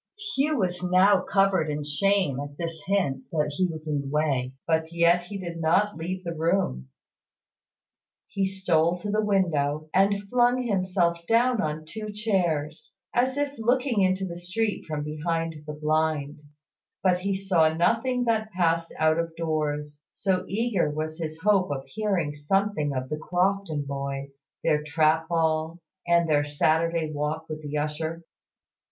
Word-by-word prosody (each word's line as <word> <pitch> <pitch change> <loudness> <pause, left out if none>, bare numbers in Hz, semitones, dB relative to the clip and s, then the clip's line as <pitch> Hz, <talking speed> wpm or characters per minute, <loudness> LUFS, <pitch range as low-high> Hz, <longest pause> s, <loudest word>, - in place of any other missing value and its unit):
Hugh 295 +2 +1
was 180 -4 -1
now 185 +2 +4
covered 195 -4 +2
with 150 -1 -3
shame 170 -2 +1
at 145 0 -7
this 165 -2 -4
hint 175 -10 0
that 150 -2 0
he 185 +2 +2
was 160 -2 -7
in 145 -2 0
the 140 - -7
way; 135 -3 0
but 160 0 0
yet 170 +1 +3
he 200 +3 -6
did 170 -3 -6
not 190 +6 +2
leave 180 +3 -4
the 170 -1 -3
room. 160 - 0 1.4
He 195 -1 -1
stole 175 -3 +1
to 205 +3 -4
the 215 +1 +1
window, 155 -7 +1
and 200 +1 +2
flung 245 +3 +3
himself 185 -5 +1
down 235 0 +3
on 155 -1 -3
two 215 +6 -6
chairs, 175 -8 -1 0.2
as 255 +2 +1
if 285 -1 0
looking 245 -1 +2
into 190 0 +2
the 170 -2 -6
street 205 +5 -2
from 150 -2 -3
behind 165 +2 -2
the 150 - -4
blind; 150 -1 0 0.6
but 180 -2 +3
he 195 +1 -1
saw 180 -5 +3
nothing 230 +9 +1
that 220 -2 0
passed 165 -2 +1
out 155 +1 +3
of 165 -1 -3
doors, 150 -2 -2
so 185 -2 0
eager 215 -5 0
was 155 +2 -4
his 160 -1 -5
hope 200 -4 +3
of 135 -2 -3
hearing 195 -9 -1
something 155 +1 0
of 130 -1 -3
the 150 - -2
Crofton 180 -2 0
boys, 140 0 -5 0.2
their 150 -2 +2
trap 155 +1 +2
ball, 160 0 0 0.3
and 170 -1 +4
their 145 -2 +3
Saturday 160 +2 +1
walk 150 +2 -2
with 155 0 -6
the 150 0 -4
usher. 155 +3 -3
165 Hz, 160 wpm, -26 LUFS, 155-195 Hz, 1.4 s, now